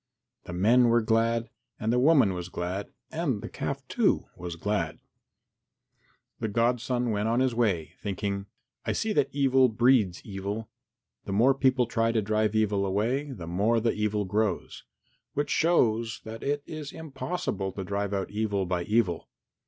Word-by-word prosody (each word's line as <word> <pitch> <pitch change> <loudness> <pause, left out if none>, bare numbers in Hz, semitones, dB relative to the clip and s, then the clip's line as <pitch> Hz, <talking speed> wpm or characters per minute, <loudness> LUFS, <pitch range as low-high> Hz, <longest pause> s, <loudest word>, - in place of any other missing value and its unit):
The 90 - -7
men 115 +8 +4
were 120 0 +3
glad, 115 +1 +1 0.3
and 110 +2 0
the 125 - +3
woman 135 -8 +5
was 90 0 -5
glad, 90 +3 -4 0.2
and 150 -9 -1
the - - -4
calf, - - -4
too, - - +2
was 85 -1 -6
glad. 85 -2 -1 1.4
The 115 - -1
godson 120 +2 +1
went 105 +1 0
on 115 +2 +2
his 130 -2 +2
way 100 -9 0
thinking, 100 0 -3 0.4
"I - - -1
see 220 -1 -1
that - - +2
evil 135 -2 +4
breeds 115 -5 +3
evil. 100 +2 -5 0.5
The - - -3
more 120 +7 +5
people 130 -2 +3
try 115 0 +1
to 110 - +2
drive 110 +1 +1
away 110 - +4 0.6
evil, 140 -3 -7
the 90 -6 -7
more 105 +7 +2
the 115 0 +1
evil 105 -1 0
grows, 105 0 -1 0.5
which 145 +1 -1
shows 115 -9 +2
that 110 +1 -8
it 145 0 -1
is 155 -2 -6
impossible 140 - -4
to 95 - -4
drive 100 +1 -2
out 100 -1 -2
evil 105 -2 -1
by 90 -1 -1
evil. 105 -7 +1
110 Hz, 160 wpm, -28 LUFS, 100-125 Hz, 1.4 s, woman